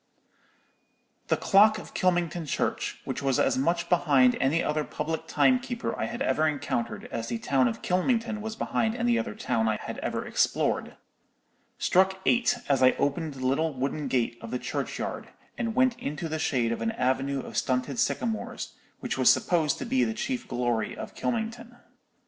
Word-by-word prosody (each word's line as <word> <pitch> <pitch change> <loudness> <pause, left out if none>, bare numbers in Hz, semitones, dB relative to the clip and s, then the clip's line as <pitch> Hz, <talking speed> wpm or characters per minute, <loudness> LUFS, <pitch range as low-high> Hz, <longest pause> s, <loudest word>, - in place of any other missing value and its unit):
"The - - +2
clock 215 +2 +5
of - - -10
Kylmington 175 -3 0
church, - - -2
which - - -3
was 135 -2 +1
as - - +3
much 170 +6 0
behind 140 -8 +4
any 145 +6 +2
other 150 0 0
public 155 +2 -4
timekeeper 250 -2 +1
I - - -2
had 240 +3 -3
ever 155 - +2
encountered 125 -5 -2
as 115 0 -3
the 115 - -2
town 130 +2 +2
of 115 - -4
Kylmington 225 +4 0
was 220 +1 -5
behind 225 0 0
any 240 0 +2
other 235 -3 -4
town 120 - 0
I 110 -1 +1
had - - -6
ever - - -3
explored, - - 0 0.8
struck 190 +1 +3
eight 245 0 +3
as 140 -2 +2
I 130 0 +6
opened 145 +1 -1
the 130 -1 -5
little 150 +3 +1
wooden 140 +3 -2
gate 120 -2 0
of 115 - -7
the 125 - -2
churchyard, - - -4 0.3
and 230 -2 -2
went 255 -2 +3
into 150 +4 -4
the 155 0 -3
shade 125 -7 +1
of 115 - -3
an 225 - 0
avenue 135 - 0
of - - -10
stunted 130 - 0
sycamores, 230 -2 -2 0.3
which - - -3
was - - +7
supposed 160 -5 +1
to - - -5
be 260 +2 +2
the 225 - -1
chief 250 +2 -3
glory 120 -2 -1
of - - -7
Kylmington. 235 +1 -3
160 Hz, 175 wpm, -27 LUFS, -, 0.8 s, was